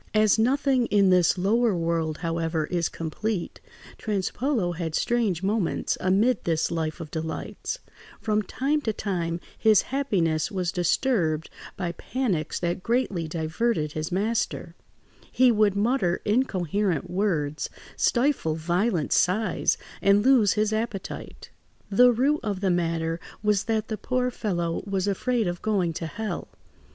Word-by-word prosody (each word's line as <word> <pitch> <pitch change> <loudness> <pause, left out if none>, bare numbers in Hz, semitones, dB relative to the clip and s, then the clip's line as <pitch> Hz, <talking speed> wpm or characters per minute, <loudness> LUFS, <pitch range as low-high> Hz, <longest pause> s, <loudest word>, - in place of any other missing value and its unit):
As 215 0 +4
nothing 260 +1 +2
in 200 -2 +4
this 180 0 +4
lower 215 +3 +2
world, 165 -2 -1
however, 165 -1 -1
is 170 0 -1
complete, 175 +4 -4 0.4
Trespolo 215 0 -1
had 165 -2 -3
strange 225 -8 0
moments 200 -2 0
amid 205 +5 +2
this 160 -2 0
life 160 -1 -2
of 160 -3 -8
delights; 160 - -4 0.4
from 215 -1 +1
time 280 +8 -1
to 220 -6 -1
time 175 -5 -2 0.2
his 220 -2 +5
happiness 175 - +1
was 180 -3 -2
disturbed 175 - 0 0.3
by 175 -2 -2
panics 180 - -2
that 175 +2 -1
greatly 205 -8 0
diverted 160 +2 -1
his 155 +3 -4
master; 210 +5 -1 0.6
he 255 -1 +5
would 210 -3 +3
mutter 205 -4 +1
incoherent 200 - 0
words, 170 -6 -1 0.3
stifle 240 - +1
violent 175 +2 0
sighs, 210 +5 +2 0.2
and 200 +2 +4
lose 245 -7 +5
his 215 0 +1
appetite. 215 -3 -5 0.4
The 245 +5 +6
root 275 +6 +2
of 200 -4 -3
the 190 -2 +2
matter 165 -1 -1 0.2
was 210 -2 +2
that 220 -1 -1
the 220 - -3
poor 250 +4 -1
fellow 175 -7 -2
was 195 -1 -1
afraid 225 +2 0
of 175 0 -3
going 195 -6 0
to 165 +1 -4
hell. 220 +6 -4
195 Hz, 135 wpm, -26 LUFS, 170-225 Hz, 0.6 s, The